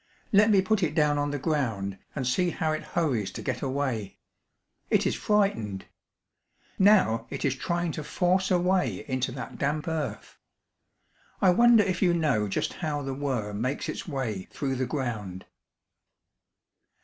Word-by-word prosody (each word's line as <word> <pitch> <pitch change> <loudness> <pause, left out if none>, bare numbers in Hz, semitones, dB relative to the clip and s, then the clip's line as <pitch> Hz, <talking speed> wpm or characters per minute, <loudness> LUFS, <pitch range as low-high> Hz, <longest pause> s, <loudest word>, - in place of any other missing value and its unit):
Let 210 +2 +5
me 195 -3 +5
put 215 +1 +1
it 155 -3 0
down 150 -2 +3
on 145 0 0
the 145 - -2
ground 115 - -2 0.2
and 135 - -2
see 175 +9 +2
how 160 -2 -1
it 155 - -2
hurries 130 - -1
to - - -7
get - - -2
away. 130 -7 -2 0.7
It - - +3
is - - +1
frightened. 115 - 0 0.9
Now 185 - +4
it - - -4
is 135 - +2
trying 170 +4 -1
to 155 - -5
force 185 +4 +1
a 185 - +4
way 175 - 0
into 130 -1 -1
that 125 - -7
damp 150 +2 -1
earth. 160 -3 -4 1.0
I 185 - +5
wonder 235 +2 +6
if 185 -2 -2
you 175 -3 +4
know 140 -11 +1
just 95 - -2
how 150 -4 -3
the 135 0 -3
worm 120 -7 -3
makes 130 +4 -2
its - - -5
way 120 - -3
through 135 -2 -3
the 130 0 -1
ground." 110 - -4
145 Hz, 160 wpm, -27 LUFS, 125-175 Hz, 1.0 s, wonder